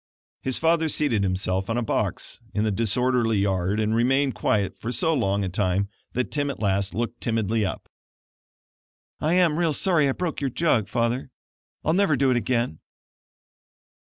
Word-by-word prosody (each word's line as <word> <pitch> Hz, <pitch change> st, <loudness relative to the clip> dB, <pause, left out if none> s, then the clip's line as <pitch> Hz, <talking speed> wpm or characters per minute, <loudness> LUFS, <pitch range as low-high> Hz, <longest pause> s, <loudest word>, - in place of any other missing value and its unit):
His 130 Hz, -1 st, 0 dB
father 165 Hz, 0 st, +2 dB
seated 140 Hz, -8 st, +1 dB
himself 95 Hz, 0 st, -1 dB
on 115 Hz, -, 0 dB
a 120 Hz, -, 0 dB
box 110 Hz, -, -2 dB, 0.2 s
in 105 Hz, -, +1 dB
the 110 Hz, -, +1 dB
disorderly 115 Hz, +2 st, +1 dB
yard 100 Hz, 0 st, 0 dB
and 110 Hz, 0 st, +1 dB
remained 135 Hz, +3 st, +2 dB
quiet 105 Hz, -2 st, 0 dB
for 115 Hz, -, -4 dB
so 160 Hz, +5 st, +2 dB
long 100 Hz, -7 st, +1 dB
a -, -, -1 dB
time 95 Hz, +1 st, 0 dB, 0.2 s
that 125 Hz, 0 st, -2 dB
Tim 145 Hz, -1 st, 0 dB
at 140 Hz, -, -5 dB
last 100 Hz, -1 st, 0 dB
looked 120 Hz, +1 st, -3 dB
timidly 115 Hz, -1 st, 0 dB
up. 95 Hz, -, -4 dB, 1.3 s
"I 155 Hz, +3 st, +1 dB
am 170 Hz, -3 st, +3 dB
real 165 Hz, -3 st, +2 dB
sorry 155 Hz, -5 st, +2 dB
I -, -, +1 dB
broke 170 Hz, -2 st, -3 dB
your 140 Hz, -, 0 dB
jug, 120 Hz, -, +1 dB
Father. 120 Hz, +4 st, -1 dB, 0.6 s
I'll 160 Hz, -, +2 dB
never 185 Hz, -5 st, +3 dB
do 135 Hz, -1 st, +2 dB
it -, -, +2 dB
again." 120 Hz, -6 st, -1 dB
115 Hz, 170 wpm, -24 LUFS, 100-140 Hz, 1.3 s, am